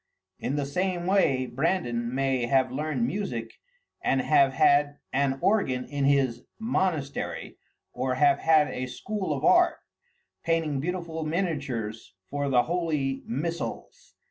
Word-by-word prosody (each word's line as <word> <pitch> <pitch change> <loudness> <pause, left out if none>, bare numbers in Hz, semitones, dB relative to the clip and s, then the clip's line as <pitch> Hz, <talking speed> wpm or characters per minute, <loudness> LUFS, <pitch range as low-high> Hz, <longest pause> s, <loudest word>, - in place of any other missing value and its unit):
In 140 - -2
the 145 -1 -1
same 180 +4 -1
way 175 -9 +2
Brandan 120 -4 -1
may 135 -3 +1
have 130 -1 +2
learned 140 -3 -1
music 120 - -3 0.5
and 135 - +2
have 140 -2 +4
had 145 +2 +3 0.2
an 135 0 +1
organ 135 -12 +2
in 145 -1 -2
his 135 -4 +2 0.2
monastery, 185 - -2 0.3
or 130 +1 -1
have 140 +1 +4
had 155 -2 +4
a 130 0 -4
school 200 +7 -4
of 140 -2 -1
art, - - +5 0.7
painting 165 -4 0
beautiful 170 0 -3
miniatures 140 - -3 0.2
for 145 0 -1
the 125 -2 +4
holy 155 -6 -1
missals. 170 - -5
140 Hz, 130 wpm, -27 LUFS, 130-165 Hz, 0.7 s, art